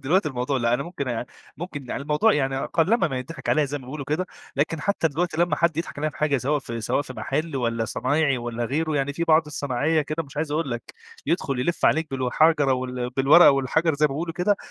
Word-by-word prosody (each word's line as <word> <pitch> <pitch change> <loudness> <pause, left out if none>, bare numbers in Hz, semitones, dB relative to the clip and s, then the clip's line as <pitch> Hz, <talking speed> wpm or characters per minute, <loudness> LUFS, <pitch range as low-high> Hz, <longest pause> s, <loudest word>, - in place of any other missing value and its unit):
دلوقتي 170 +4 +2
الموضوع 130 0 -2
لأ، 120 -1 +2
أنا 130 - -1
ممكن 155 -4 -5
آآ، 120 0 -3 0.3
ممكن 145 -5 -7
يعني 140 - -3
الموضوع 150 +10 +3
يع 135 -3 0
قلّما 175 +3 +2
ما 130 -3 -3
يتضِحِك 140 +3 -8
عليَّ 155 -1 +3
زي 145 +1 -4
ما 130 - -13
بيقولوا 140 +3 -6
كده، 155 +7 -1 0.3
لكن 155 +2 0
حتى 200 -2 +1
دلوقتي 165 +3 -2
لمّا 175 0 +2
حد 170 -2 +1
يضحك 165 -2 -4
عليَّ 155 +1 -1
في - - -15
حاجة 150 -2 +1
سواء 145 +4 0
في 115 -4 -6
سواء 115 - 0
في 130 - -9
محل، 150 +3 -3
والّا 115 -3 -1
صنايعي 135 +5 0
والّا 120 0 -3
غيره 155 +5 -1
يعني 140 0 0
في 170 +4 -2
بعض 160 -1 +5
الصناعية 150 +2 0
كده 155 +3 -3
مش 145 -1 -15
عايز 150 0 -2
أقول 155 -2 -1
لك، 120 -1 -6 0.3
يدخُل 140 -5 0
يلِف 170 +6 -1
عليك 160 0 +2
بالحَجرة 135 +2 +2
وال 125 -1 -3
بالورقة 135 +7 +7
والحجر 145 +4 +1
زي 150 +1 +3
ما - - -3
بيقولوا 165 +4 -3
كده، 200 +4 +2
145 Hz, 230 wpm, -24 LUFS, 130-160 Hz, 0.3 s, بالورقة